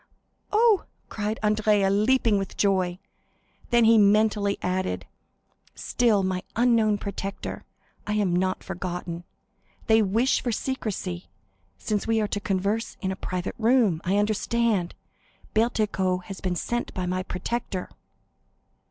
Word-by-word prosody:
"Oh," 435 Hz, -2 st, +4 dB, 0.2 s
cried 215 Hz, +1 st, -3 dB
Andrea, 210 Hz, -2 st, +3 dB
leaping 215 Hz, +1 st, +3 dB
with 195 Hz, -, -6 dB
joy. 185 Hz, -3 st, +1 dB, 0.7 s
Then 240 Hz, -1 st, +4 dB
he 225 Hz, 0 st, +6 dB
mentally 205 Hz, 0 st, +3 dB
added,—"Still 195 Hz, +3 st, -2 dB
my 185 Hz, -1 st, -1 dB
unknown 225 Hz, -3 st, +3 dB
protector! 200 Hz, 0 st, -5 dB, 0.4 s
I 210 Hz, -, 0 dB
am 200 Hz, -4 st, +1 dB
not 185 Hz, +1 st, 0 dB
forgotten. 175 Hz, -2 st, -5 dB, 0.6 s
They 220 Hz, 0 st, +5 dB
wish 225 Hz, +6 st, +2 dB
for 245 Hz, -, -1 dB
secrecy, 205 Hz, -7 st, -3 dB, 0.5 s
since 210 Hz, -1 st, -2 dB
we 225 Hz, 0 st, +2 dB
are 210 Hz, -, +1 dB
to 205 Hz, -, -2 dB
converse 200 Hz, +3 st, -1 dB
in 190 Hz, -, -2 dB
a -, -, -3 dB
private 185 Hz, -1 st, -4 dB
room. 225 Hz, -8 st, +3 dB
I 190 Hz, +3 st, +1 dB
understand, 215 Hz, -2 st, +1 dB, 0.6 s
Bertuccio 205 Hz, -5 st, +1 dB
has 195 Hz, 0 st, -8 dB
been 185 Hz, -1 st, -1 dB
sent 240 Hz, +7 st, -2 dB
by 185 Hz, -2 st, -2 dB
my 185 Hz, +1 st, -1 dB
protector." 185 Hz, +1 st, -4 dB
205 Hz, 125 wpm, -26 LUFS, 185-225 Hz, 0.7 s, he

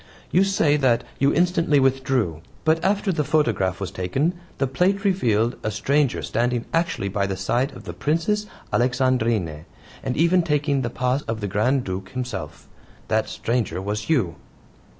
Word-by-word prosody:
You 185 Hz, -, +5 dB
say 165 Hz, -7 st, +2 dB
that 130 Hz, -5 st, +2 dB, 0.2 s
you 140 Hz, +1 st, +4 dB
instantly 165 Hz, -3 st, +3 dB
withdrew. 130 Hz, -, +1 dB, 0.2 s
But 160 Hz, +1 st, +2 dB
after 200 Hz, +1 st, +1 dB
the 155 Hz, -4 st, 0 dB
photograph 110 Hz, -, +1 dB
was 95 Hz, -, -4 dB
taken 130 Hz, -, 0 dB, 0.2 s
the 135 Hz, -, +1 dB
plate 180 Hz, +9 st, +1 dB
revealed 120 Hz, -, +2 dB
a 110 Hz, -, -1 dB
stranger 135 Hz, +6 st, +1 dB
standing 120 Hz, +1 st, 0 dB
actually 165 Hz, -11 st, 0 dB
by 100 Hz, 0 st, -1 dB
the 95 Hz, -1 st, -3 dB
side 120 Hz, +9 st, 0 dB
of -, -, -11 dB
the -, -, -6 dB
Princess 210 Hz, +8 st, 0 dB, 0.3 s
Alexandrine, 120 Hz, -, +1 dB, 0.4 s
and 130 Hz, -2 st, -3 dB
even 170 Hz, +4 st, +4 dB
taking 145 Hz, -3 st, +1 dB
the 120 Hz, -, -2 dB
PAS 125 Hz, +3 st, 0 dB
of 115 Hz, 0 st, -2 dB
the 105 Hz, -, -3 dB
Grand 120 Hz, +7 st, +1 dB
Duke 95 Hz, -1 st, -5 dB
himself. 120 Hz, -12 st, -5 dB, 0.4 s
That -, -, +1 dB
stranger 115 Hz, -5 st, -1 dB
was 105 Hz, +5 st, -4 dB
you!" 115 Hz, -, +1 dB
130 Hz, 160 wpm, -23 LUFS, 105-155 Hz, 0.4 s, You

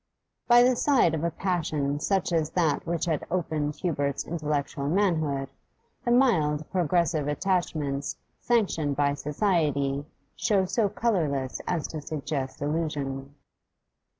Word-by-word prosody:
By 240 Hz, 0 st, +7 dB
the 250 Hz, 0 st, +4 dB
side 245 Hz, -, +3 dB
of 160 Hz, 0 st, -2 dB
a 170 Hz, -, +2 dB
passion 155 Hz, -6 st, -1 dB
such 190 Hz, +2 st, 0 dB
as 160 Hz, -2 st, +1 dB
that 165 Hz, -3 st, +1 dB
which 170 Hz, 0 st, -1 dB
had 160 Hz, -3 st, -1 dB
opened 155 Hz, -4 st, -1 dB
Hubert's 145 Hz, -5 st, -1 dB
intellectual 150 Hz, -3 st, -2 dB
manhood, 155 Hz, -7 st, +1 dB, 0.5 s
the 240 Hz, -, -1 dB
mild, 160 Hz, -, +3 dB
progressive 170 Hz, -4 st, +1 dB
attachments 150 Hz, -4 st, -1 dB, 0.2 s
sanctioned 180 Hz, -12 st, +1 dB
by 140 Hz, 0 st, +2 dB
society 145 Hz, -2 st, 0 dB, 0.3 s
show 195 Hz, -3 st, +2 dB
so 205 Hz, +2 st, +1 dB
colourless 165 Hz, -, -1 dB
as 170 Hz, -4 st, -1 dB
to 155 Hz, -, -5 dB
suggest 140 Hz, -2 st, -4 dB
illusion. 145 Hz, -3 st, -2 dB
155 Hz, 125 wpm, -27 LUFS, 145-185 Hz, 0.5 s, By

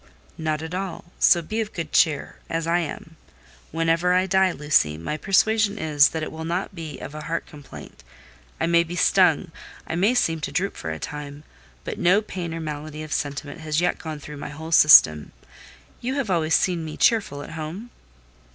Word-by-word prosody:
"Not 155 Hz, -1 st, -2 dB
at 160 Hz, +2 st, -7 dB
all: 185 Hz, -2 st, -5 dB
so 170 Hz, -1 st, +5 dB
be 215 Hz, +8 st, -2 dB
of 215 Hz, -1 st, -5 dB
good 165 Hz, -3 st, -5 dB
cheer—as 160 Hz, +1 st, 0 dB
I 170 Hz, +1 st, +2 dB
am. 160 Hz, 0 st, -6 dB, 0.5 s
Whenever 165 Hz, +2 st, +1 dB
I 185 Hz, +1 st, +3 dB
die, 190 Hz, 0 st, +3 dB
Lucy, 145 Hz, -, +1 dB
my 85 Hz, -, -4 dB
persuasion 205 Hz, +5 st, +2 dB
is 150 Hz, -5 st, +4 dB
that 160 Hz, -1 st, -4 dB
it -, -, -5 dB
will 160 Hz, 0 st, -7 dB
not 175 Hz, +5 st, -3 dB
be 160 Hz, -5 st, -7 dB
of 145 Hz, -, -9 dB
heart 155 Hz, +2 st, -4 dB
complaint. 145 Hz, -2 st, -13 dB, 0.6 s
I -, -, +1 dB
may 170 Hz, 0 st, +4 dB
be 170 Hz, +1 st, -7 dB
stung, -, -, +3 dB, 0.3 s
I -, -, -5 dB
may 200 Hz, +9 st, +2 dB
seem 165 Hz, -9 st, +1 dB
to -, -, -4 dB
droop 195 Hz, +2 st, -1 dB
for 80 Hz, -, -6 dB
a 80 Hz, -, -4 dB
time, 145 Hz, -, -7 dB, 0.4 s
but -, -, -6 dB
no 185 Hz, +4 st, +4 dB
pain 180 Hz, -5 st, -6 dB
or 165 Hz, -, -5 dB
malady 155 Hz, 0 st, -6 dB
of 155 Hz, -, -5 dB
sentiment 145 Hz, +2 st, -4 dB
has 155 Hz, -1 st, -1 dB
yet 175 Hz, 0 st, 0 dB
gone 155 Hz, -2 st, -6 dB
through 150 Hz, +1 st, -9 dB
my -, -, -7 dB
whole 160 Hz, +2 st, -8 dB
system. 80 Hz, -, +7 dB, 0.7 s
You 255 Hz, +3 st, -3 dB
have 265 Hz, -8 st, -2 dB
always 165 Hz, -2 st, +2 dB
seen 175 Hz, -3 st, +1 dB
me 155 Hz, -1 st, -7 dB
cheerful 200 Hz, -, +1 dB
at -, -, -10 dB
home?" 165 Hz, +9 st, -7 dB
160 Hz, 190 wpm, -23 LUFS, 150-180 Hz, 0.7 s, system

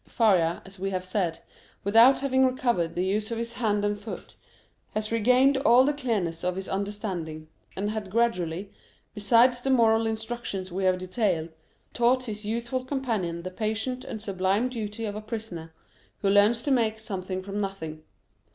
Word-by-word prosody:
Faria, 180 Hz, -7 st, +2 dB
as 195 Hz, 0 st, -13 dB
we 195 Hz, +1 st, -1 dB
have 185 Hz, -1 st, -3 dB
said, 185 Hz, -3 st, -1 dB, 0.5 s
without 230 Hz, +7 st, +6 dB
having 265 Hz, -1 st, +2 dB
recovered 240 Hz, -10 st, +1 dB
the 180 Hz, +1 st, 0 dB
use 210 Hz, +3 st, -1 dB
of 230 Hz, -, -3 dB
his 235 Hz, 0 st, -4 dB
hand 210 Hz, -4 st, 0 dB
and 205 Hz, 0 st, -1 dB
foot, 220 Hz, +1 st, -8 dB, 0.6 s
had 215 Hz, 0 st, -2 dB
regained 250 Hz, +5 st, +4 dB
all 260 Hz, -1 st, +5 dB
the 295 Hz, -, +2 dB
clearness 210 Hz, -, -2 dB
of 180 Hz, 0 st, 0 dB
his 190 Hz, 0 st, -5 dB
understanding, 190 Hz, -6 st, -4 dB, 0.3 s
and 205 Hz, +2 st, -1 dB
had 215 Hz, -3 st, -4 dB
gradually, 190 Hz, -4 st, 0 dB, 0.4 s
besides 235 Hz, +4 st, +4 dB
the 270 Hz, -, -2 dB
moral 225 Hz, -3 st, +4 dB
instructions 220 Hz, -4 st, -3 dB
we 190 Hz, +2 st, -2 dB
have 185 Hz, 0 st, +3 dB
detailed, 185 Hz, -3 st, -1 dB, 0.4 s
taught 250 Hz, +2 st, +3 dB
his 215 Hz, -3 st, -6 dB
youthful 235 Hz, +4 st, -2 dB
companion 225 Hz, -11 st, -2 dB
the 185 Hz, -, -5 dB
patient 220 Hz, +5 st, -2 dB
and 215 Hz, -, -7 dB
sublime 195 Hz, +4 st, 0 dB
duty 225 Hz, -2 st, -4 dB
of 205 Hz, -1 st, -4 dB
a 210 Hz, -, -5 dB
prisoner, 215 Hz, -7 st, -6 dB, 0.5 s
who 200 Hz, -, +3 dB
learns 210 Hz, +4 st, +4 dB
to 285 Hz, -, 0 dB
make 225 Hz, -4 st, +2 dB
something 190 Hz, -3 st, -4 dB
from 200 Hz, +1 st, -4 dB
nothing. 160 Hz, -6 st, -4 dB
210 Hz, 170 wpm, -27 LUFS, 185-235 Hz, 0.6 s, without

